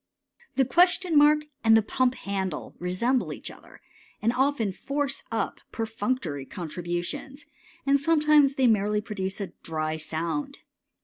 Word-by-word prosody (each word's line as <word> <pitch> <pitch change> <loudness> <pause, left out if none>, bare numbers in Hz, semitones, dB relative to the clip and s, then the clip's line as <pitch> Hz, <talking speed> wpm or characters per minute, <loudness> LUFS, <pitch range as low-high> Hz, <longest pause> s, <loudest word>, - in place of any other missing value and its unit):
The 270 - +3
question 355 +4 +3
mark 300 +1 +6 0.2
and 225 -1 +7
the 220 - +3
pump 255 +3 +1
handle 190 -8 -4
resemble 230 +9 0
each - - -7
other, - - -16 0.4
and 230 +2 +1
often 255 -5 +1
force 275 +6 -2
up - - -2
perfunctory 220 - -2
contributions, 175 - -5 0.4
and 280 0 +4
sometimes 300 -2 +4
they 265 - +2
merely 210 -2 +3
produce 195 -3 -4
a 195 -4 -5
dry 155 -1 -2
sound. 170 - -3
230 Hz, 130 wpm, -27 LUFS, 190-280 Hz, 0.4 s, and